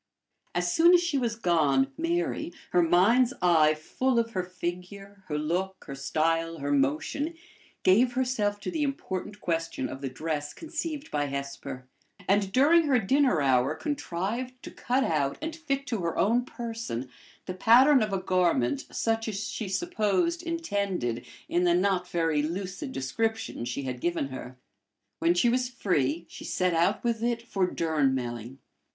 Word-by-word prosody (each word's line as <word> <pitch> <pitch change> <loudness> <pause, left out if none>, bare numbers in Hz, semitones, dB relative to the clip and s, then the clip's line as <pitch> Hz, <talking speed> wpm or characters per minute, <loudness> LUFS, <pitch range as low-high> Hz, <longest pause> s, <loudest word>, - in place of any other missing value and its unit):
As 175 0 +1
soon 340 +2 +7
as 350 - +4
she 320 -5 0
was 235 -3 -1
gone, 145 -9 +2
Mary, 170 +2 -1 0.2
her 180 - +4
mind's 220 +10 +4
eye 160 -4 +4
full 250 +11 -1
of 230 0 +1
her 185 - -1
figure, 180 +3 -7
her 150 -3 -2
look, 180 +5 -2
her 140 - -7
style, 165 +4 0
her 145 -1 -3
motion, 150 - 0 0.5
gave 240 +7 +4
herself 240 -5 0
to - - -4
the 320 -3 -2
important 210 -8 -3
question 165 -5 -2
of 135 - -8
the 135 - -3
dress 150 +2 -4
conceived 320 -2 -5
by 145 -1 0
Hesper; 140 -2 -5 0.4
and 195 0 +2
during 310 +8 +5
her 270 -3 +4
dinner 245 - +2
hour 130 +2 +3
contrived 235 - -3
to - - -8
cut 255 +2 0
out 145 - 0
and 320 +1 -4
fit 275 -4 -2
to 235 -5 -2
her 170 -2 -2
own 235 +4 +2
person 230 - -5 0.4
the 185 - -4
pattern 250 +8 +6
of 215 -1 0
a 195 - +1
garment 170 -9 +1
such 225 0 0
as 205 -1 -3
she 215 -4 -4
supposed 335 - 0
intended 200 - -2 0.2
in 175 - +1
the 175 -1 +4
not 185 -1 +1
very 165 -3 +1
lucid 190 - -4
description 220 - -2
she 125 +3 -3
had 125 -2 -5
given 170 -5 -1
her. 130 -1 -8 0.6
When 170 +1 +3
she 180 - +3
was 250 +1 +1
free, 170 - 0
she - - -10
set 185 -1 0
out 165 +1 +2
with 230 -2 0
it 235 0 -1
for 195 -5 0
Durnmelling. 130 -7 -1
185 Hz, 160 wpm, -28 LUFS, 155-240 Hz, 0.6 s, soon